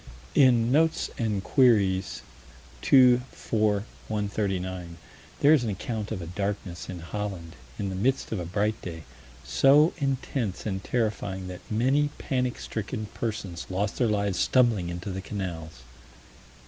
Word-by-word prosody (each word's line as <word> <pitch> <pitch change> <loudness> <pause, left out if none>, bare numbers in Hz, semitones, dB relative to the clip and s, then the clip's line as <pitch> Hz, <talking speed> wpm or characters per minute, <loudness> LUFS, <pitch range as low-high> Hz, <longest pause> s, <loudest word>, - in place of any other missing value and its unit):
In 125 -4 +5
Notes 160 +3 +2
and 105 -4 -1
Queries, 95 - +3 0.6
2 125 -2 +6
4 105 -2 0 0.2
139, 95 -5 -2 0.4
there 145 +2 +7
is 145 -6 +4
an 115 - -1
account 110 +1 -4
of 95 -5 -3
a - - -5
darkness 100 0 -4
in 90 -2 -6
Holland, 90 -2 -5 0.2
in 100 - -2
the 95 - -4
midst 130 +8 0
of 110 - -1
a 90 - -4
bright 105 +5 -1
day, 80 -2 -7 0.4
so 145 +5 +5
intense 135 -6 -2
and 95 -3 -3
terrifying 105 -5 -2
that 90 -1 -8
many 135 +7 +2
panic 125 -2 -1
stricken 110 0 -5
persons 100 -7 -4
lost 100 +2 -1
their 120 - +3
lives 100 -3 0
stumbling 115 -9 +3
into 85 +3 -5
the 95 +1 -4
canals. 85 -6 -6
105 Hz, 140 wpm, -27 LUFS, 95-120 Hz, 0.6 s, there